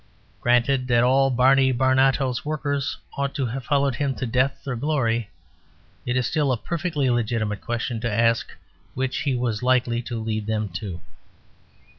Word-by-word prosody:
Granted 125 Hz, +2 st, +2 dB
that 120 Hz, -1 st, +3 dB
all 135 Hz, +2 st, +4 dB
Barney 130 Hz, +1 st, +4 dB
Barnato's 130 Hz, 0 st, +2 dB
workers 145 Hz, -2 st, -2 dB, 0.2 s
ought 140 Hz, 0 st, -2 dB
to 135 Hz, -, 0 dB
have 125 Hz, +3 st, -4 dB
followed 140 Hz, -2 st, +2 dB
him 135 Hz, +1 st, -1 dB
to 130 Hz, -, -3 dB
death 130 Hz, +4 st, 0 dB
or 130 Hz, -, -2 dB
glory, 120 Hz, -5 st, 0 dB, 0.8 s
it 125 Hz, +1 st, +1 dB
is 125 Hz, -, +1 dB
still 145 Hz, -3 st, +1 dB
a 125 Hz, -, +1 dB
Perfectly 165 Hz, -, -2 dB
legitimate 110 Hz, -3 st, -1 dB
question 120 Hz, 0 st, -3 dB
to 115 Hz, -1 st, -1 dB
ask 115 Hz, +2 st, +2 dB, 0.5 s
which 130 Hz, 0 st, -1 dB
he 140 Hz, -4 st, 0 dB
was 120 Hz, -4 st, -1 dB
likely 125 Hz, -2 st, +2 dB
to 120 Hz, 0 st, -5 dB
lead 110 Hz, -1 st, -3 dB
them 110 Hz, -1 st, -1 dB
to. 90 Hz, -1 st, -6 dB
125 Hz, 160 wpm, -24 LUFS, 115-135 Hz, 0.8 s, all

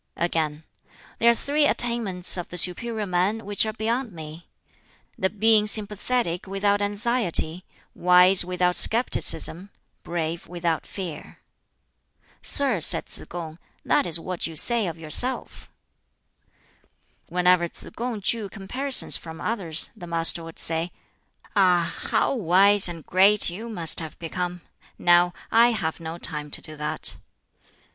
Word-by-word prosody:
Again, 160 Hz, -3 st, -2 dB, 0.6 s
"There 235 Hz, -, +4 dB
are 235 Hz, -, +4 dB
three 290 Hz, +4 st, 0 dB
attainments 225 Hz, -9 st, +1 dB
of 175 Hz, -2 st, -4 dB
the 180 Hz, -, -7 dB
superior 215 Hz, +5 st, +1 dB
man 190 Hz, +4 st, -1 dB
which 205 Hz, +2 st, +1 dB
are 215 Hz, -, -4 dB
beyond 230 Hz, +3 st, -3 dB
me 160 Hz, 0 st, -11 dB, 0.7 s
the 190 Hz, -, -1 dB
being 215 Hz, +1 st, +2 dB
sympathetic 210 Hz, -2 st, -2 dB
without 200 Hz, +1 st, 0 dB
anxiety, 205 Hz, -5 st, +1 dB, 0.3 s
wise 180 Hz, +1 st, +5 dB
without 180 Hz, 0 st, -1 dB
scepticism, 200 Hz, -4 st, +1 dB, 0.3 s
brave 170 Hz, -1 st, -5 dB
without 170 Hz, -2 st, -3 dB
fear." 175 Hz, -7 st, -8 dB, 1.0 s
"Sir," 270 Hz, -9 st, +5 dB
said -, -, +3 dB
Tsz -, -, -1 dB
kung, 165 Hz, -2 st, -8 dB, 0.3 s
"that -, -, +1 dB
is 170 Hz, -1 st, -1 dB
what 180 Hz, 0 st, -4 dB
you 165 Hz, -, -10 dB
say 230 Hz, +5 st, 0 dB
of 165 Hz, -, -6 dB
yourself." 165 Hz, +11 st, -2 dB, 1.6 s
Whenever 180 Hz, -1 st, +2 dB
Tsz -, -, -5 dB
kung 235 Hz, -2 st, -4 dB
drew 210 Hz, 0 st, -2 dB
comparisons 255 Hz, +8 st, +1 dB
from 160 Hz, -1 st, -11 dB
others, 185 Hz, -8 st, -1 dB
the 175 Hz, -, -11 dB
Master 165 Hz, 0 st, +3 dB
would 165 Hz, 0 st, -11 dB
say, 165 Hz, +1 st, +1 dB, 0.6 s
"Ah, 180 Hz, -4 st, +2 dB, 0.2 s
how -, -, +1 dB
wise 200 Hz, -2 st, +4 dB
and 165 Hz, -3 st, -9 dB
great 195 Hz, +1 st, +3 dB
you 220 Hz, +7 st, -8 dB
must 170 Hz, -7 st, +2 dB
have 160 Hz, -2 st, -8 dB
become! 175 Hz, +1 st, -5 dB, 0.4 s
Now 175 Hz, 0 st, +3 dB, 0.2 s
I 235 Hz, +1 st, +4 dB
have 165 Hz, -7 st, -4 dB
no 165 Hz, 0 st, -7 dB
time 150 Hz, -4 st, -4 dB
to -, -, -1 dB
do 155 Hz, -, -5 dB
that." 150 Hz, 0 st, -1 dB
180 Hz, 135 wpm, -24 LUFS, 170-215 Hz, 1.6 s, wise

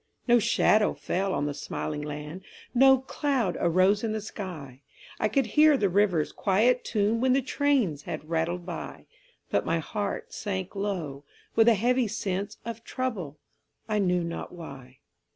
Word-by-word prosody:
No 240 Hz, 0 st, +6 dB
shadow 210 Hz, 0 st, +3 dB
fell 195 Hz, +2 st, -1 dB
on 145 Hz, -4 st, 0 dB
the 145 Hz, -, -2 dB
smiling 150 Hz, +1 st, -4 dB
land, 150 Hz, +4 st, -6 dB, 0.3 s
No 265 Hz, +1 st, +7 dB
cloud 265 Hz, -, -1 dB
arose 185 Hz, +5 st, +3 dB
in 220 Hz, -1 st, -1 dB
the 220 Hz, -, -1 dB
sky; 165 Hz, -, -8 dB, 0.4 s
I -, -, +2 dB
could 270 Hz, +1 st, +2 dB
hear 300 Hz, +6 st, +5 dB
the 205 Hz, -5 st, +1 dB
river's 180 Hz, -5 st, +2 dB
quiet 225 Hz, +6 st, +2 dB
tune 220 Hz, +1 st, 0 dB
When 260 Hz, 0 st, +3 dB
the 270 Hz, -, +3 dB
trains 260 Hz, -, +1 dB
had 155 Hz, -, -6 dB
rattled 170 Hz, +2 st, -1 dB
by; 175 Hz, -3 st, -7 dB, 0.5 s
But -, -, +2 dB
my -, -, 0 dB
heart 200 Hz, +5 st, -4 dB
sank 190 Hz, -2 st, -4 dB
low 175 Hz, -9 st, -3 dB, 0.3 s
with 225 Hz, 0 st, +5 dB
a 235 Hz, -, +7 dB
heavy 245 Hz, +3 st, +2 dB
sense 200 Hz, -2 st, -3 dB
Of 230 Hz, -1 st, -6 dB
trouble, 210 Hz, -, -4 dB, 0.5 s
I 215 Hz, -1 st, 0 dB
knew 180 Hz, -3 st, +2 dB
not 170 Hz, 0 st, -5 dB
why. 135 Hz, -7 st, -10 dB
195 Hz, 160 wpm, -27 LUFS, 165-230 Hz, 0.5 s, No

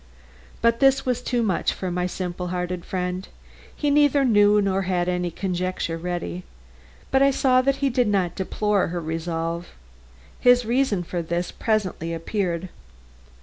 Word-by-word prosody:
But 230 Hz, 0 st, +3 dB
this 270 Hz, 0 st, +4 dB
was 250 Hz, -1 st, 0 dB
too 245 Hz, -1 st, 0 dB
much 190 Hz, -6 st, 0 dB
for 185 Hz, -1 st, -4 dB
my 180 Hz, +1 st, -1 dB
simple 180 Hz, -1 st, -4 dB
hearted 180 Hz, 0 st, -3 dB
friend. 180 Hz, 0 st, -3 dB, 0.5 s
He 295 Hz, -1 st, 0 dB
neither 290 Hz, -1 st, +4 dB
knew 205 Hz, -3 st, +5 dB
nor 195 Hz, -1 st, +1 dB
had 180 Hz, -2 st, 0 dB
any 180 Hz, -1 st, 0 dB
conjecture 185 Hz, -1 st, -2 dB
ready. 165 Hz, -, -4 dB, 0.7 s
But 270 Hz, -, +3 dB
I 275 Hz, -, +6 dB
saw 260 Hz, -1 st, +3 dB
that 275 Hz, +1 st, +1 dB
he 270 Hz, -, +2 dB
did 245 Hz, -1 st, +2 dB
not 190 Hz, -4 st, +1 dB
deplore 205 Hz, +1 st, 0 dB
her 175 Hz, +1 st, -3 dB
resolve. 165 Hz, +1 st, -3 dB, 0.7 s
His 245 Hz, -1 st, +5 dB
reason 235 Hz, -5 st, +1 dB
for 175 Hz, 0 st, -3 dB
this 170 Hz, +1 st, -2 dB
presently 185 Hz, -7 st, -1 dB
appeared. 175 Hz, 0 st, -2 dB
185 Hz, 150 wpm, -24 LUFS, 175-235 Hz, 0.7 s, I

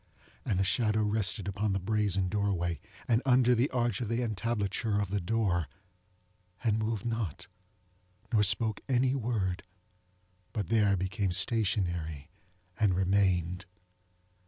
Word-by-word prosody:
And 95 Hz, -, -1 dB
the 95 Hz, -, +2 dB
shadow 110 Hz, +1 st, +1 dB
rested 105 Hz, -1 st, 0 dB
upon 100 Hz, +1 st, -1 dB
the 95 Hz, -, 0 dB
brazen 100 Hz, -1 st, 0 dB
doorway, 90 Hz, -5 st, -1 dB, 0.3 s
and 115 Hz, 0 st, +3 dB
under 125 Hz, -1 st, +4 dB
the 125 Hz, +4 st, +2 dB
arch 120 Hz, -4 st, 0 dB
of 120 Hz, -, -2 dB
the 115 Hz, +3 st, 0 dB
entablature 110 Hz, -1 st, -1 dB
of 100 Hz, -2 st, -2 dB
the 100 Hz, -1 st, 0 dB
door, 90 Hz, -4 st, 0 dB, 1.0 s
and 110 Hz, -2 st, +2 dB
moved 110 Hz, -1 st, -2 dB
not, 115 Hz, -9 st, -3 dB, 0.9 s
nor 110 Hz, -, +5 dB
spoke 105 Hz, +2 st, 0 dB
any 130 Hz, 0 st, +3 dB
word, 110 Hz, -8 st, -1 dB, 0.9 s
but 105 Hz, -5 st, -3 dB
there 105 Hz, -3 st, +3 dB
became 95 Hz, +1 st, -1 dB
stationary 90 Hz, -, 0 dB, 0.5 s
and 100 Hz, -4 st, +3 dB
remained. 90 Hz, -1 st, +1 dB
105 Hz, 130 wpm, -30 LUFS, 95-115 Hz, 1.0 s, nor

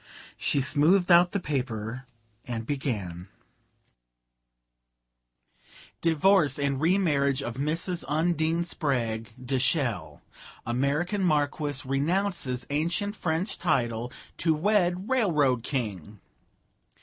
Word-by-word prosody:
She 140 Hz, -, 0 dB
smoothed 165 Hz, +7 st, +3 dB
out 175 Hz, +1 st, +6 dB
the 200 Hz, -, -1 dB
paper 125 Hz, -, -4 dB, 0.4 s
and 115 Hz, -2 st, -4 dB
began: 105 Hz, -, -3 dB, 2.7 s
"'Divorce 165 Hz, -2 st, +3 dB
and 140 Hz, -1 st, -1 dB
remarriage 145 Hz, -6 st, +2 dB
of 120 Hz, -2 st, -5 dB
Mrs. 165 Hz, +5 st, -1 dB
Undine 160 Hz, +2 st, +1 dB
Spragg 115 Hz, -9 st, -2 dB
de 130 Hz, +1 st, -2 dB
Chelles. 115 Hz, -, -1 dB, 0.4 s
American 145 Hz, -, 0 dB
Marquise 145 Hz, -3 st, 0 dB
renounces 140 Hz, -2 st, 0 dB
ancient 170 Hz, +8 st, -1 dB
French 175 Hz, +2 st, -2 dB
title 120 Hz, -7 st, 0 dB, 0.3 s
to 160 Hz, -2 st, +2 dB
wed 185 Hz, +1 st, +1 dB
Railroad 155 Hz, -, +2 dB
King. 105 Hz, -, -4 dB
145 Hz, 90 wpm, -27 LUFS, 125-175 Hz, 2.7 s, out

